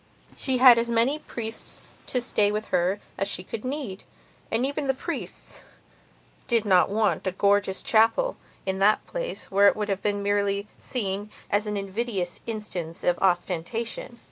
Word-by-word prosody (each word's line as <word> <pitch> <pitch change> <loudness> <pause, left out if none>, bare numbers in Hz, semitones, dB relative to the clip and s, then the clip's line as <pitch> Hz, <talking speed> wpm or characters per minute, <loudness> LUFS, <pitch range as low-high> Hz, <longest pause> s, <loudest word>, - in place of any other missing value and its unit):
She 260 -2 +1
had 250 -2 +8
as 235 0 -1
many 235 +6 +2
priests 225 -6 -5 0.2
to 250 - 0
stay 210 -4 +2
with 215 +1 -3
her 185 +4 +1 0.2
as 195 - 0
could 180 - -10
be 255 - -3
neededand 240 -2 -5
even 280 +1 -2
the 265 - +2
priests - - -4 0.8
did 230 -3 +3
not 185 -3 +4
want 210 -1 +1
a - - +1
gorgeous 200 0 +2
chapel 225 - +3 0.3
in 190 0 -1
that 210 +2 +3
place - - -5
where 200 +1 +6
it - - +5
would 210 -1 -3
have 195 -1 -2
merely 200 0 0
seemed 205 -4 -3 0.2
an 210 0 +1
invidious 195 -2 -2
instance 190 -7 -4
of 175 -1 +2
ostentation. 190 +6 -1
210 Hz, 150 wpm, -26 LUFS, 195-235 Hz, 0.8 s, had